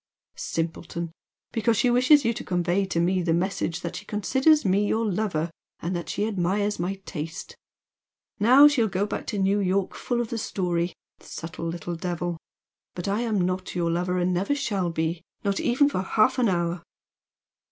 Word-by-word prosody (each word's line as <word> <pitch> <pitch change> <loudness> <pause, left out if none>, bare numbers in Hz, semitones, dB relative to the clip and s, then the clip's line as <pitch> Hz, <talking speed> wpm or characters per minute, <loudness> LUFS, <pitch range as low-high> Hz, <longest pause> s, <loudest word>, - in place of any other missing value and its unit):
"Simpleton! 170 0 -4 0.4
Because 225 -1 +1
she 245 - +3
wishes 255 +3 +5
you 230 - +2
to - - -6
convey 180 +2 +1
to 170 - -1
me 180 +2 +2
the 165 -2 +1
message 175 -2 -1
that 170 - -4
she - - -8
considers 265 +10 +3
me 200 +2 +3
your 225 +2 +1
lover 180 -5 -1 0.3
and 175 +2 -3
that 170 - -4
she 205 - -1
admires 205 0 0
my 180 +3 -1
taste! 160 0 -6 0.8
Now 255 +7 +8
she'll 260 -6 +2
go 195 0 0
back 210 - -5
to 210 - -2
New 195 +1 +2
York 190 0 0
full 240 -1 -2
of 235 -2 -2
the 230 - -2
story! 175 -4 -1 0.2
Subtle 165 0 -7
little 170 +1 -4
devil! 175 0 -3 0.6
But 175 - -4
I 200 +2 +1
am 220 -5 0
not 185 +1 -3
your 170 -1 +1
lover, 180 +2 0
and 180 0 +1
never 195 +11 0
shall 200 -10 -1
be, 165 0 -2 0.2
not 200 -1 0
even 265 +4 +3
for 235 -10 -1
half 215 +7 +2
an 240 -4 +3
hour!" 170 -1 -1
190 Hz, 180 wpm, -26 LUFS, 175-220 Hz, 0.8 s, Now